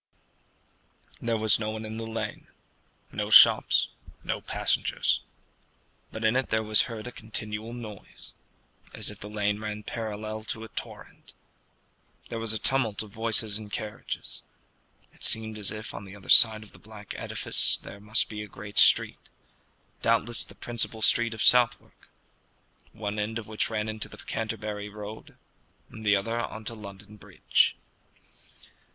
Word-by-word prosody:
There 115 -1 0
was 110 -2 +3
no 110 -1 -3
one 110 0 -5
in 110 +1 -7
the 115 0 -5
lane 115 0 -5 0.6
no - - -3
shops, - - +7 0.3
no - - -3
passengers; - - 0 0.9
but 110 - -7
in 110 +2 +2
it 130 0 0
there 110 0 0
was 110 +3 +2
heard 110 -2 -7
a 125 - -6
continual 110 0 -5
noise, 110 -4 -10 0.6
as - - +1
if - - -13
the 105 - -8
lane 105 -1 -1
ran 105 0 -6
parallel 110 0 -5
to 110 0 -5
a 110 - -10
torrent. - - -9 0.9
There 115 - -4
was 115 -1 0
a 110 - 0
tumult 115 -3 0
of 105 - -13
voices 110 0 +1
and 110 - -9
of 105 - -18
carriages. 105 0 -5 0.7
It - - -15
seemed 110 -1 +3
as 100 - 0
if 110 0 -7
on 100 - -8
the 95 +1 -11
other 100 - -14
side 110 -2 +8
of 105 - -15
the - - -15
black 105 -2 -10
edifice - - +2
there 100 - -12
must 105 +2 +2
be 105 -1 -7
a 105 - -7
great 105 0 -2
street, - - +4 0.7
doubtless 120 +1 +5
the - - -12
principal 115 -2 -3
street 115 -1 +3
of 110 - -2
Southwark, 125 -2 +3 0.8
one 105 0 -5
end 110 +2 -2
of 115 - -6
which 110 0 -2
ran 110 -1 -2
into 110 0 -4
the - - -12
Canterbury 105 -2 -5
road, 105 +1 -10 0.5
and 110 - -10
the 100 -1 +4
other 115 +4 -2
on 110 -2 -6
to 115 - -4
London 105 -1 -12
Bridge. - - +1
110 Hz, 160 wpm, -27 LUFS, 105-110 Hz, 0.9 s, side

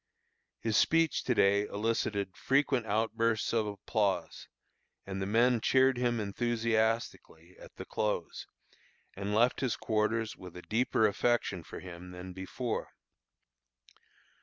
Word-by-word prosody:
His 110 -2 +1
speech 165 -1 +3
to 125 - +1
day 100 +1 +3
elicited 100 -2 -1
frequent 135 -3 +1
outbursts 110 +1 0
of 110 -2 +1
applause, 100 -3 -2 0.6
and 95 0 -5
the 95 - -2
men 115 +2 +3
cheered 130 +2 +4
him 120 -2 +1
enthusiastically 110 -5 -1
at - - -14
the - - -8
close, 105 -5 -3 0.7
and 100 +2 -3
left 120 +3 +3
his 130 -3 0
quarters 110 +1 -1
with 90 -1 -11
a 90 - -9
deeper 110 0 +1
affection 105 -3 +1
for - - -9
him 90 0 -9
than 90 +1 -8
before. 105 +6 -4
110 Hz, 125 wpm, -31 LUFS, 100-120 Hz, 0.7 s, cheered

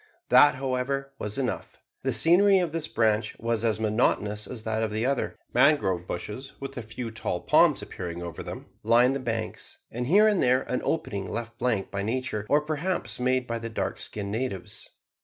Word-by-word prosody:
That, 130 +2 +7
however, 135 +1 -2
was 105 +3 -4
enough. 130 -3 -3 0.2
The 135 - 0
scenery 175 - +6
of 175 -4 0
this 160 -1 -2
branch 110 -1 +1
was 115 -1 -1
as 110 -2 +1
monotonous 105 -1 +1
as 120 -4 -7
that 110 0 -1
of 110 - 0
the 110 +2 -1
other. 140 0 -1 0.2
Mangrove 120 - +3
bushes, 105 +9 -6
with 135 0 -7
a 120 - -4
few 115 +1 -6
tall 110 -5 -3
palms - - +4
appearing 85 -1 -6
over 85 -2 -6
them, - - -7 0.2
lined 120 +4 +4
the - - -2
banks, 115 -3 -4
and 120 +1 -3
here 205 +8 +6
and 210 -3 +2
there 125 +1 +3
an 125 - -2
opening 100 -11 -2
left 115 +1 -5
blank 115 -6 0
by 100 - -2
nature, 110 -1 -2
or 145 +1 +4
perhaps 155 +3 -3
made 130 0 +1
by 115 -1 -3
the 115 0 -5
dark 110 - -3
skinned 100 -1 -4
natives. 110 -5 -4
120 Hz, 190 wpm, -27 LUFS, 110-135 Hz, 0.2 s, That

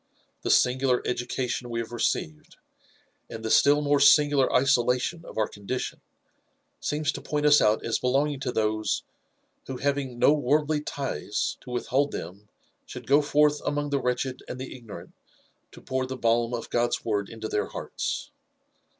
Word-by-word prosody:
The - - -3
singular 125 0 +3
education 125 0 -2
we 115 0 -2
have 115 0 -5
received, 80 -9 -2 0.7
and 110 0 -7
the 110 - -1
still 145 +1 +5
more 145 0 +3
singular 145 -1 +5
isolation 125 +4 +2
of - - -11
our 110 -1 +2
condition, 105 +5 -5 0.8
seems 150 0 -1
to - - -7
point 150 0 -2
us 150 0 +6
out 110 0 +2
as 115 - 0
belonging 135 +3 +1
to 130 -1 -2
those, 110 -2 0 0.6
who 130 - -5
having 140 -2 -2
no 140 - +5
worldly 150 +1 +1 0.2
lies 105 - -2
to - - -12
withhold 130 +3 0
them 100 +5 -7 0.4
should - - -9
go 145 +2 +5
forth 150 0 +2
amongst 145 0 -2
the 140 -1 +1
wretched 125 +1 -2
and 130 - -6
the 130 0 -7
ig 120 -3 -14
norant 90 -5 -9 0.6
to - - -13
pour 130 -1 -2
the 130 0 -5
balm 115 0 +1
of 115 - -7
God's 120 0 0
word 105 -3 -1
into 110 -1 -6
their 105 - -1
hearts. - - -4
130 Hz, 165 wpm, -26 LUFS, 115-145 Hz, 0.8 s, us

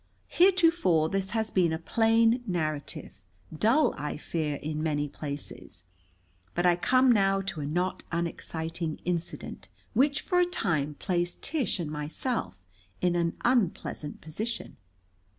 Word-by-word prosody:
Heretofore 335 - +4
this 195 +1 0
has 220 0 -1
been 175 -3 +3
a 160 - 0
plain 225 +6 +3
narrative, 155 - -3 0.3
dull, 230 - +3
I 150 +1 -4
fear, 155 -1 -2
in 150 +2 -4
many 150 -2 0
places. 140 - -7 0.7
But 175 - +1
I 175 -1 +6
come 255 +8 +4
now 195 -3 +3
to 190 -5 -4
a 140 - -3
not 180 +5 -1
unexciting 165 -1 -3
incident 175 -1 -4 0.2
which 280 +5 +3
for 360 - +1
a 355 - +5
time 155 - -1
placed 175 -2 -2
Tish 285 - 0
and 155 -3 -3
myself 150 - -3 0.4
in 175 -1 +2
an 170 -1 0
unpleasant 200 - 0
position. 215 +10 -4
175 Hz, 135 wpm, -28 LUFS, 155-225 Hz, 0.7 s, I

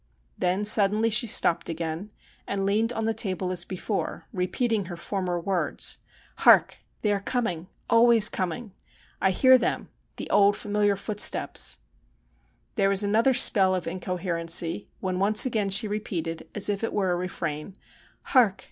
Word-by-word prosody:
Then 185 +3 -1
suddenly 215 +2 +3
she 215 +3 +3
stopped 170 -5 +1
again, 165 +4 -5 0.4
and 195 -1 -3
leaned 215 +4 0
on 225 -2 -4
the 225 - 0
table 185 -4 -1
as 175 -1 -2
before, 195 +3 -5
repeating 200 +3 -2
her 175 -1 -8
former 180 -1 -4
words: 180 0 -2 0.2
' - - -29
Hark! - - +4 0.2
They 210 - +1
are 200 - -1
coming 195 -7 -3
— - - -41
always 230 -2 +5
coming. 190 +5 -4 0.5
I 190 - +3
hear 260 +7 +4
them; - - -3 0.3
the - - -7
old 200 0 +4
familiar 205 -1 0
footsteps.' 205 +1 +1 1.0
There 195 - +2
was 195 +1 +4
another 225 +6 +2
spell 190 -5 +5
of 180 - -4
incoherency, 175 -1 -2
when 185 -1 -3
once 210 +4 +4
again 220 -5 -1
she 215 +3 +3
repeated, 170 -6 -5
as 210 - +2
if 205 +1 -2
it 225 - -3
were 195 -3 -1
a - - 0
refrain: 175 -1 -6 0.2
' - - -32
Hark 235 -8 +3
195 Hz, 160 wpm, -25 LUFS, 180-215 Hz, 1.0 s, always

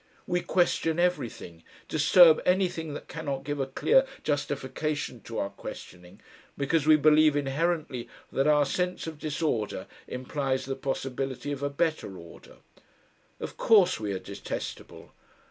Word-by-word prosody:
We 175 -1 0
question 170 -3 +1
everything, 130 - -2 0.2
disturb 160 +2 +6
anything 180 -5 0
that - - -8
cannot 140 -4 -4
give 145 +1 -3
a 135 - -1
clear - - +3 0.2
justification 145 -2 -2
to 115 - -7
our 100 - -2
questioning, 90 0 -10 0.4
because 145 +2 +1
we 155 - +8
believe 155 0 +5
inherently 145 -2 -1 0.2
that 135 +2 +1
our 150 -1 +5
sense 180 +6 -2
of 160 -2 -7
disorder 150 -8 -2 0.2
implies 130 +1 -2
the 135 0 -3
possibility 135 0 -3
of 140 -1 -4
a 145 - 0
better 145 - -1
order. 85 -1 -14 0.8
Of - - -6
course 200 -5 +4
we 105 -2 -3
are - - -2
detestable. 95 +2 -7
145 Hz, 135 wpm, -28 LUFS, 130-160 Hz, 0.8 s, we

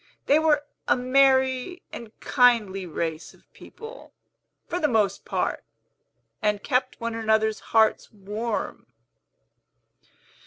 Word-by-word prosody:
They 290 +3 +4
were 300 -2 +2 0.2
a - - +3
merry 260 +5 +2
and 230 -2 -10
kindly 225 -8 +2
race 160 0 -4
of - - -29
people, 455 +2 -12 0.6
for 355 - -2
the 305 - +2
most 210 -6 0
part, - - -2 0.8
and 210 -2 0
kept 255 -1 -1
one 230 -1 -3
another's 220 -1 +1
hearts 220 -1 +1
warm." 210 +2 -5
230 Hz, 110 wpm, -25 LUFS, 210-270 Hz, 0.8 s, They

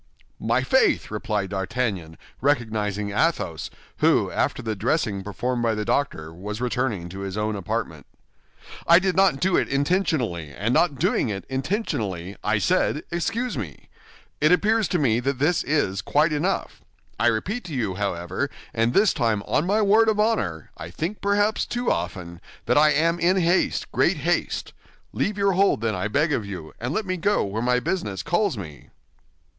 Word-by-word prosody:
"My - - +1
faith!" 450 - +2
replied 105 -2 -2
D'Artagnan, 95 -4 -2 0.2
recognizing 110 -7 0
Athos, 105 - 0 0.3
who, - - +3
after - - -1
the 110 -1 -2
dressing 105 - 0
performed 120 +5 -2
by 115 -2 +1
the 105 0 -3
doctor, 80 - -1
was 105 +5 -6
returning 125 -7 -1
to 95 +2 -8
his 100 0 -5
own 105 0 -1
apartment. 100 -3 -4 0.8
"I 170 - +8
did 185 0 +1
not 190 -7 +4
do 185 -1 +2
it - - +2
intentionally, 140 - 0
and 105 - -2
not 160 +1 +3
doing 120 - +1
it 100 -2 -4
intentionally, 130 - -2
I 105 +1 +2
said 165 - +1
'Excuse 220 - -2
me.' 85 -10 -8 0.5
It 155 +2 +4
appears 215 +3 +3
to 180 - 0
me 120 -7 +2
that 135 +2 -1
this 155 +6 +2
is 100 -11 0
quite 150 - +2
enough. 175 +6 -2 0.4
I 120 - +3
repeat 185 - -1
to 160 -5 -6
you, 110 -7 -1
however, 95 +5 -2 0.2
and 115 +1 +1
this 200 -1 +5
time 115 -5 0
on 155 - 0
my 210 +3 +2
word 220 +3 +5
of 210 -1 0
honor—I 90 - -1
think 165 - -4
perhaps 205 +1 +2
too 245 0 -1
often—that 90 +6 -4
I 150 +1 +6
am 165 +3 +2
in 180 +3 +3
haste, 175 0 +1
great - - +2
haste. - - -1 0.4
Leave 205 0 -1
your 200 -1 +3
hold, 195 - +2
then, 115 -1 0
I 95 +2 -2
beg 150 +8 +1
of 115 - 0
you, 95 -6 -8
and 120 +3 -3
let 215 +6 -1
me 185 -1 -2
go 205 +5 +1
where 105 +3 -3
my 125 +1 +2
business 105 - -3
calls 175 - +1
me." 80 -7 -9
125 Hz, 170 wpm, -24 LUFS, -, 0.8 s, I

